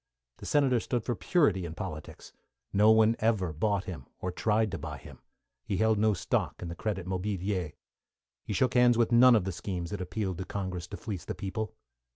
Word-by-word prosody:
The - - -9
Senator 135 -4 +3
stood 120 0 -2
for 120 - -1
purity 115 - +2
in 85 -1 -6
politics. 75 -1 -7 0.4
No 105 +2 +5
one 110 +1 +5
ever 105 -7 +1
bought 100 +5 0
him, 80 -9 -8
or 90 - -3
tried 110 +3 +1
to 95 - -4
buy 75 -1 -6
him. - - -13 0.4
He 95 - -2
held 110 +1 +3
no 110 -1 +3
stock 85 - -1
in 85 - -4
the 85 - -6
Credit 95 -2 -3
Mobilier. 95 -2 -2 0.7
He - - -4
shook 125 +5 +2
hands 125 -1 +5
with 115 0 +2
none 120 +1 +7
of 105 - +3
the 95 - -2
schemes 90 0 -5
that 100 -2 -4
appealed 95 0 -3
to 95 - -4
Congress 95 -3 -4
to - - -7
fleece 100 -7 -6
the - - -4
people. 110 +2 -4
100 Hz, 200 wpm, -29 LUFS, 90-110 Hz, 0.7 s, none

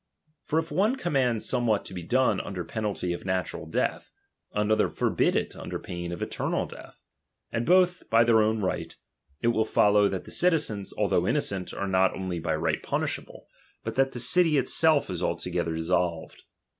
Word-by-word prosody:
For 155 - -2
if 165 +1 -1
one 210 +7 +2
command 135 - 0
some 125 -2 +1
what 105 -2 +1
to - - -8
be 90 - -5
done 130 +9 +2
under 90 -3 -5
penalty 100 -3 -3
of 85 - -7
natural 95 -2 -3
death, - - -2 0.4
another 105 +1 +1
forbid - - +1
it - - -1
under - - -5
pain 85 0 -6
of 85 - -4
eternal - - -2
death, - - -13 0.5
and 115 +1 -2
both 180 0 +3
by 115 +1 +5
their 115 -1 +4
own 110 0 +1
right, 95 - -3 0.4
it 120 - +2
will 110 -2 +2
follow 105 -1 +4
that 95 - -4
the - - -11
citizens, 150 - +1
although - - +1
innocent, 95 -2 -1
are 100 - -4
not 95 0 +2
only 95 -2 -3
by 85 - -1
right - - -1
punishable, - - -3 0.4
but - - -4
that 135 0 +1
the 120 - -5
city 155 +5 +4
itself 150 +3 +3
is 90 - -4
altogether 80 -1 -2
dis 80 0 -3
solved. 85 -3 -1
110 Hz, 180 wpm, -27 LUFS, 95-135 Hz, 0.5 s, by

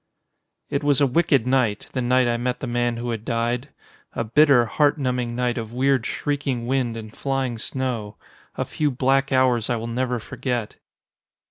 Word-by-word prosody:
It 140 +1 -1
was 145 -2 +3
a 145 - +5
wicked 140 -3 +2
night, 125 -5 +1
the 130 - -1
night 125 +1 +3
I 120 - +1
met 125 +1 -2
the - - -4
man 120 -1 0
who 120 +1 -3
had 115 -2 -4
died. 120 +3 -1 0.4
A - - -1
bitter, 130 +1 +5
heart 145 +6 +2
numbing 125 -3 -1
night 125 -1 0
of 115 0 -7
weird, 130 -1 +2
shrieking 140 -5 -2
wind 125 -2 0
and 110 -1 -9
flying 135 -4 -2
snow. 120 -5 -3 0.4
A - - -2
few 150 -1 0
black 135 +1 +1
hours 130 -3 +2
I 120 - +2
will 115 0 -4
never 125 +1 -1
forget. 120 0 -4
125 Hz, 175 wpm, -23 LUFS, 120-135 Hz, 0.4 s, a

